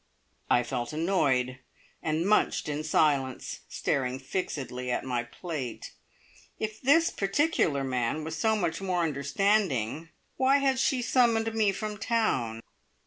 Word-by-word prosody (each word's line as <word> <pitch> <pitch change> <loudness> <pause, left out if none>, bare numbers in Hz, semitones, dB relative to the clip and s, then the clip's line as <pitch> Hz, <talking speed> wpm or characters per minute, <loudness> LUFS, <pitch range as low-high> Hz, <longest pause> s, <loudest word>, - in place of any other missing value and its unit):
I 120 - +4
felt 120 +3 -4
annoyed, 135 -7 +1 0.4
and 160 +2 0
munched 210 - +2
in 150 0 -2
silence, 140 -4 +1
staring 130 -1 -1
fixedly 130 -4 -4
at 125 - -1
my 125 -2 0
plate. 130 -1 -6 0.7
If 215 0 -4
this 325 +6 +4
particular 195 - +1
man 130 +3 -1
was 160 +1 -4
so 220 +7 +2
much 175 -4 -1
more 180 -3 0
understanding, 155 - 0 0.3
why 265 +2 +4
had 270 -2 +1
she 260 -2 +1
summoned 230 -3 +2
me 215 -3 +3
from 210 +1 -5
town? 130 - 0
160 Hz, 130 wpm, -28 LUFS, 130-215 Hz, 0.7 s, I